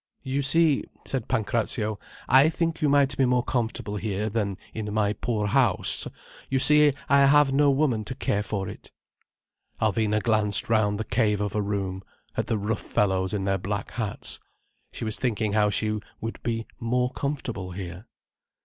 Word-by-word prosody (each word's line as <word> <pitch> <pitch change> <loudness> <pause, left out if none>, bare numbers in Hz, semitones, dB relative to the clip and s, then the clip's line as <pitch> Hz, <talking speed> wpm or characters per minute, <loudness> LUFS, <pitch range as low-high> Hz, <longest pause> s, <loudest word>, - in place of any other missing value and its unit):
"You 135 +1 -1
see," 150 +1 +3 0.2
said 130 -5 -3
Pancrazio, 110 -1 -1 0.3
"I 135 +4 +6
think 165 0 -2
you 150 - +3
might 140 -1 +3
be 135 - +3
more 125 -1 +2
comfortable 115 -4 -2
here, 105 0 -2
than 100 -3 -1 0.2
in 105 -2 -4
my 105 -1 +1
poor 110 -2 -2
house. 100 - +2 0.4
You 135 - +1
see 150 +1 +5
I 140 0 +5
have 145 -1 +5
no 145 +1 +4
woman 135 -6 +1
to 130 - -6
care 105 -6 0
for 100 -2 -3
it—" - - -10 0.9
Alvina 110 0 +1
glanced 105 -3 +2
round 105 -2 +2
the - - -1
cave 105 -1 +1
of 105 -1 -2
a 105 - 0
room, 100 -2 -2 0.3
at - - -1
the 110 - 0
rough 105 +1 -2
fellows 95 -2 0
in 105 -2 -1
their 95 0 0
black 100 +2 -4
hats. 110 -4 -2 0.5
She - - -5
was 110 - -3
thinking 110 -4 0
how 105 -1 +3
she 105 +1 -1 0.2
would 115 +1 -5
be 115 -1 -2
"more 125 +2 0
comfortable" 120 -10 -4
here. 90 +3 -7
110 Hz, 170 wpm, -26 LUFS, 105-130 Hz, 0.9 s, I